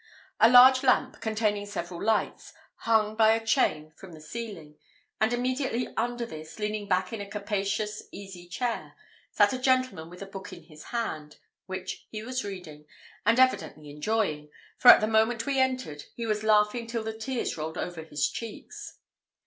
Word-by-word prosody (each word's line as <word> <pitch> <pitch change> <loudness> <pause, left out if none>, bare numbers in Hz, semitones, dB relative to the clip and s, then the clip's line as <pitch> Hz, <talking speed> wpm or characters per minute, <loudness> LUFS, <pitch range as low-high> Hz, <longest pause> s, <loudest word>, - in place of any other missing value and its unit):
A 225 - +7
large 255 +1 +8
lamp, 260 0 +2
containing 215 -2 -1
several 175 -3 -5
lights, 220 +1 -1 0.2
hung 215 -2 +1
by 220 0 +5
a 225 0 -2
chain 155 - +1
from 185 -1 -12
the 160 - -11
ceiling, 165 -3 -8 0.4
and 220 +1 +2
immediately 250 0 -1
under 240 +1 -1
this, 155 -7 -10
leaning 210 -1 -3
back 185 +1 0
in 220 - -4
a 200 - -7
capacious 210 +1 -2
easy 190 -3 -10
chair, 230 +6 -3 0.3
sat - - +3
a 255 - -3
gentleman 255 -11 +1
with 180 +2 -9
a - - -7
book 195 -1 -9
in - - -11
his 155 -2 -14
hand, 155 -11 -4 0.3
which 185 0 -6
he 215 -1 -6
was 255 +2 -3
reading, 170 -7 -8 0.4
and 230 +3 +4
evidently 155 - +1
enjoying, 150 -2 -1 0.3
for - - 0
at - - +10
the 215 - +1
moment 225 +1 +2
we 275 -1 0
entered 255 - -1
he 235 - -4
was 215 -1 -1
laughing 215 +2 +3
till 230 -1 -3
the 220 0 -4
tears 235 +3 -3
rolled 160 0 -5
over 175 -2 -4
his 145 -3 -1
cheeks. 220 +9 -8
215 Hz, 175 wpm, -28 LUFS, 180-235 Hz, 0.4 s, at